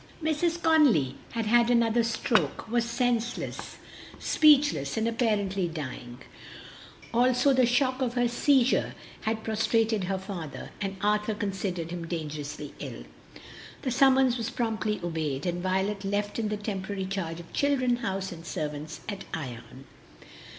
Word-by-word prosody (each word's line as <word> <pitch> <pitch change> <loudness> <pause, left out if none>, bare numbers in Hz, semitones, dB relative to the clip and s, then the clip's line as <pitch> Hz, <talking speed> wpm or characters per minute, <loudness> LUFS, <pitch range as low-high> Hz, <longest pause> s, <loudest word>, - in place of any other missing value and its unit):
Mrs. 325 +2 +1
Conly 280 - +4 0.2
had 230 -1 -1
had 235 +2 +4
another 235 -1 +3
stroke, 230 0 0
was 235 +1 +1
senseless, 240 -1 -1 0.4
speechless, 285 - +4
and 220 +1 +1
apparently 205 -5 0
dying; 130 -6 -6 1.0
also 250 +3 +4
the 255 -2 +4
shock 255 +2 +1
of 245 -1 -1
her 245 -1 +3
seizure 260 +1 +2 0.3
had 220 0 -1
prostrated 220 -1 +1
her 190 +1 -1
father, 185 -6 -7
and 195 -1 -3
Arthur 210 +1 +1
considered 190 -5 -3
him 170 -1 -5
dangerously 150 -3 -5
ill. - - -7 0.8
The 260 - -1
summons 265 0 +4
was 225 - -2
promptly 220 -2 -1
obeyed, 155 -4 -2
and 175 0 -1
Violet 190 +2 0
left 205 +2 -1
in 220 - 0
the 210 - -2
temporary 200 -2 -4
charge 185 -4 -3
of 170 - -12
children, 255 -4 +2
house, 195 -5 -3
and 165 -1 -9
servants 150 -3 -5
at 200 -2 -5
Ion. 125 -3 -8
210 Hz, 135 wpm, -28 LUFS, 175-240 Hz, 1.0 s, Conly